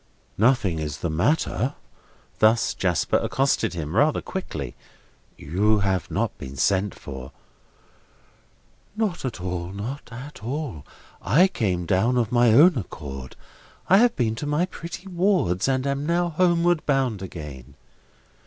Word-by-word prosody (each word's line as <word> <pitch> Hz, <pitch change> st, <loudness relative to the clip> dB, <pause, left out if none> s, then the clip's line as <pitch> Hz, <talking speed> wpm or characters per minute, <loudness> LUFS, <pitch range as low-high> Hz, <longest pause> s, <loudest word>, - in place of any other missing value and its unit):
"Nothing 105 Hz, -8 st, +3 dB
is 75 Hz, -1 st, -4 dB
the 85 Hz, -, -3 dB
matter?" 125 Hz, -, 0 dB, 0.6 s
Thus 110 Hz, +2 st, +4 dB
Jasper 90 Hz, -5 st, +1 dB
accosted 135 Hz, -9 st, 0 dB
him, 80 Hz, 0 st, -4 dB
rather 145 Hz, +5 st, +3 dB
quickly. 75 Hz, -, -5 dB, 0.6 s
"You 105 Hz, +7 st, +1 dB
have 95 Hz, -3 st, 0 dB
not -, -, -1 dB
been 65 Hz, +1 st, -8 dB
sent 100 Hz, +6 st, +1 dB
for?" 65 Hz, -2 st, -9 dB, 1.6 s
"Not 210 Hz, -9 st, -1 dB
at 125 Hz, -, -4 dB
all, 90 Hz, -1 st, -4 dB
not 115 Hz, +9 st, -6 dB
at 125 Hz, +2 st, -9 dB
all. 125 Hz, -, -4 dB, 0.3 s
I 150 Hz, -, +4 dB
came 95 Hz, -, -1 dB
down 100 Hz, +8 st, +2 dB
of 115 Hz, -4 st, 0 dB
my 120 Hz, -1 st, +4 dB
own 150 Hz, +4 st, +6 dB
accord. 70 Hz, -, -8 dB, 0.5 s
I 190 Hz, -, +7 dB
have 240 Hz, +3 st, +4 dB
been 115 Hz, -3 st, 0 dB
to 145 Hz, -, -4 dB
my 150 Hz, +4 st, +1 dB
pretty 180 Hz, +1 st, -8 dB
ward's, 175 Hz, -, +1 dB
and 130 Hz, 0 st, +1 dB
am 140 Hz, +1 st, -1 dB
now 175 Hz, +1 st, +1 dB
homeward 175 Hz, 0 st, +2 dB
bound 130 Hz, -8 st, +1 dB
again." 75 Hz, -9 st, -9 dB
115 Hz, 135 wpm, -24 LUFS, 90-150 Hz, 1.6 s, I